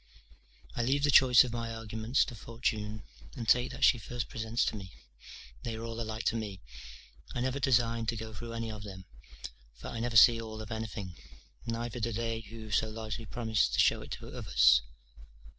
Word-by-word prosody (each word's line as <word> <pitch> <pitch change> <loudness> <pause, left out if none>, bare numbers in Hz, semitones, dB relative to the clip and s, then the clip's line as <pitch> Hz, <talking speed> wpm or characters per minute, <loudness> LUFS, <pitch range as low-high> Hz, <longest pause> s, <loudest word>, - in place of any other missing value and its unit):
I - - 0
leave 135 +4 +1
the 145 - +4
choice 125 -3 +8
of 125 -2 -5
my 115 -1 -3
arguments 110 +2 0
to 125 - -8
fortune, 110 -1 -3 0.3
and 120 -4 -5
take 125 +2 +4
that - - -5
she 125 - +6
first 120 +2 -5
presents 115 +1 -1
to - - -1
me; 95 -3 -8 0.7
they 115 - -4
are 110 - -6
all 115 0 -5
alike 110 0 -4
to - - +1
me, 105 -4 -4 0.8
I 120 - -1
never 130 +2 -1
design 115 -3 +2
to 115 - 0
go 110 0 -7
through 115 +2 -7
any 115 -1 -3
of 105 -1 -7
them; 95 -2 -9 0.7
for - - -8
I 115 - -5
never 115 0 +1
see 115 0 +8
all 110 -1 -7
of 110 +1 -8
anything: 110 -5 -5 0.5
neither 115 +1 -3
do 115 +1 -1
they 115 0 -2
who 110 0 -10
so 110 +2 +2
largely 110 0 -5
promise 110 +1 +1
to - - -2
show - - +4
it - - -6
others. - - +4
115 Hz, 195 wpm, -31 LUFS, 110-120 Hz, 0.8 s, choice